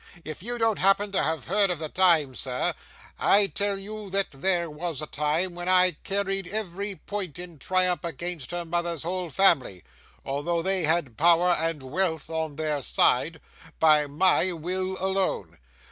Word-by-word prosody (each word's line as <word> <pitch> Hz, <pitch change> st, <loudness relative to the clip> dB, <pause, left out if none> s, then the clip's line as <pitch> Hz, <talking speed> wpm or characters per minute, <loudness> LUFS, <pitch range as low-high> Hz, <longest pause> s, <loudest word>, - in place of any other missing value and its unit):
'If 155 Hz, +1 st, -7 dB
you 240 Hz, +5 st, -4 dB
don't 225 Hz, -2 st, +1 dB
happen 195 Hz, +1 st, +3 dB
to 195 Hz, -, +1 dB
have 160 Hz, 0 st, -2 dB
heard 200 Hz, +1 st, +2 dB
of 180 Hz, -, -1 dB
the 155 Hz, 0 st, -4 dB
time, 165 Hz, -6 st, +3 dB
sir, 125 Hz, 0 st, -1 dB, 0.5 s
I 200 Hz, +1 st, +4 dB
tell 200 Hz, 0 st, -2 dB
you 210 Hz, +1 st, -8 dB
that 195 Hz, +1 st, -1 dB
there 170 Hz, +4 st, 0 dB
was 160 Hz, -1 st, -5 dB
a 155 Hz, -, -4 dB
time, 155 Hz, +5 st, -1 dB
when 175 Hz, +1 st, -5 dB
I 185 Hz, 0 st, +6 dB
carried 195 Hz, -1 st, -1 dB
every 200 Hz, 0 st, -4 dB
point 190 Hz, -5 st, -6 dB
in 175 Hz, -3 st, -10 dB
triumph 185 Hz, +1 st, +1 dB
against 170 Hz, -3 st, -5 dB
her 175 Hz, 0 st, -4 dB
mother's 170 Hz, -2 st, -3 dB
whole 180 Hz, +1 st, -3 dB
family, 140 Hz, -, +3 dB, 0.4 s
although 165 Hz, +5 st, -2 dB
they 190 Hz, -2 st, 0 dB
had 155 Hz, -8 st, 0 dB
power 170 Hz, +2 st, +4 dB
and 165 Hz, -4 st, -1 dB
wealth 160 Hz, +3 st, -2 dB
on 160 Hz, -2 st, -3 dB
their 150 Hz, -2 st, -2 dB
side, 160 Hz, +5 st, +2 dB, 0.4 s
by 155 Hz, -2 st, +4 dB
my 185 Hz, +5 st, +3 dB
will 185 Hz, +3 st, -4 dB
alone. 190 Hz, -, -2 dB
175 Hz, 165 wpm, -25 LUFS, 155-190 Hz, 0.5 s, I